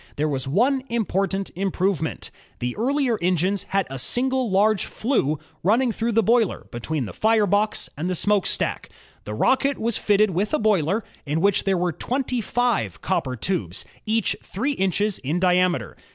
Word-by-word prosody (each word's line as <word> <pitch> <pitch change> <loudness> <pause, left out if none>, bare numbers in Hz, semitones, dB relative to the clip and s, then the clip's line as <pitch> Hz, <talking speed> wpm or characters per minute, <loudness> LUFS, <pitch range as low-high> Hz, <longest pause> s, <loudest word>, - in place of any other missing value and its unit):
There 150 +2 0
was 135 -3 -2
one 250 - +2
important 195 -4 -1
im 195 +2 -1
provement. 185 -4 -2 0.3
The 125 0 -3
earlier 255 -1 +1
engines 185 +2 +1
had 195 -1 +1
a 135 0 -6
single 260 - 0
large 200 +1 +3
flue 215 - 0 0.2
running 230 +8 +3
through 230 +1 -1
the 225 +1 +3
boiler 230 0 +2
between 130 +3 -3
the - - -8
fire 220 -1 +3
box 205 +2 +1
and 165 +5 -3
the 185 - -1
smokestack. 205 +2 +1 0.4
The 105 - -5
Rocket 270 - +2
was 230 -1 -1
fitted 210 0 +3
with 200 - 0
a - - 0
boiler, 205 -1 +2 0.2
in 150 +3 0
which 200 +2 +2
there 195 -1 +2
were 175 0 0
twenty 250 - -2
five 245 +1 -1
copper 160 -9 -1
tubes, 110 - -3 0.2
each 220 -1 +1
three 250 +10 -2
inches 205 -3 0
in 150 +6 -1
diameter. 180 -1 +2
195 Hz, 165 wpm, -23 LUFS, 175-225 Hz, 0.4 s, large